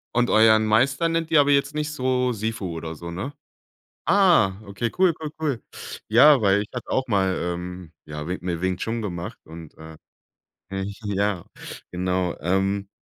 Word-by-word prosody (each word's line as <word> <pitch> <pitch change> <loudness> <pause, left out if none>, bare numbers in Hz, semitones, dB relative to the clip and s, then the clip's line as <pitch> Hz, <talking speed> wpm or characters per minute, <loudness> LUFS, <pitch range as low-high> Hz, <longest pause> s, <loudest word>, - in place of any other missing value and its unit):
Und 120 0 +2
euren 110 0 +5
Meister 135 +9 +2
nennt 165 0 -1
ihr 150 -2 +7
aber 145 - +1
jetzt 140 +1 +2
nicht 150 0 -2
so 130 -3 0
Sifu 110 -5 -3
oder 80 0 -5
so, 85 +2 -8
ne? 100 +12 -5 0.7
Ah, 180 - +5
okay, 105 +4 -3
cool, 185 -4 +4
cool, 155 -2 -5
cool. 140 -7 -1 0.5
Ja, 130 +6 +7
weil 100 0 +4
ich 105 - -5
hatte 125 - -6
auch 130 0 0
mal, 95 -3 +2
ähm, 90 -1 -5
ja, 75 0 -7
Wing 90 - -2
Mi 85 -2 -3
Wing 95 -1 0
Chun 115 +4 -3
gemacht 90 -4 -5
und, 80 -1 -11
äh, 80 0 -11 0.7
äh, 95 0 -3
ich 100 +2 -7
ja, 100 -2 -1 0.5
genau, 90 0 -1
ähm, 95 +3 0
100 Hz, 175 wpm, -24 LUFS, 90-130 Hz, 0.7 s, ihr